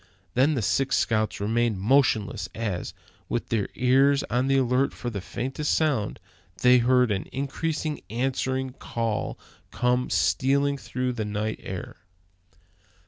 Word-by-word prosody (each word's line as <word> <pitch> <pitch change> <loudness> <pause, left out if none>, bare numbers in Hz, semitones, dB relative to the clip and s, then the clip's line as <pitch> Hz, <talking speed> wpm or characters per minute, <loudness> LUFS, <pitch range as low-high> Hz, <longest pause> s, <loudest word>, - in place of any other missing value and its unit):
Then 140 +5 +3
the 120 - -1
six 105 +8 +1
scouts 110 -1 0
remained 110 0 0
motionless, 110 -4 +2
as, 95 -6 -3 0.3
with 120 - -2
their 110 -4 0
ears 135 +3 +4
on 125 +3 +1
the 135 0 +3
alert 130 +1 +2
for 120 - -4
the 100 -3 -4
faintest 135 +9 -2
sounds, 145 -10 0 0.4
they 125 0 +7
heard 125 -1 +3
an 95 -2 -2
increasing 150 +3 -2
answering 130 +2 -1
call 115 -4 -3 0.3
come 125 +1 0
stealing 140 +1 +2
through 125 -1 -2
the 110 -3 -3
night 105 +1 -2
air. 95 -1 -7
125 Hz, 135 wpm, -26 LUFS, 110-135 Hz, 0.4 s, they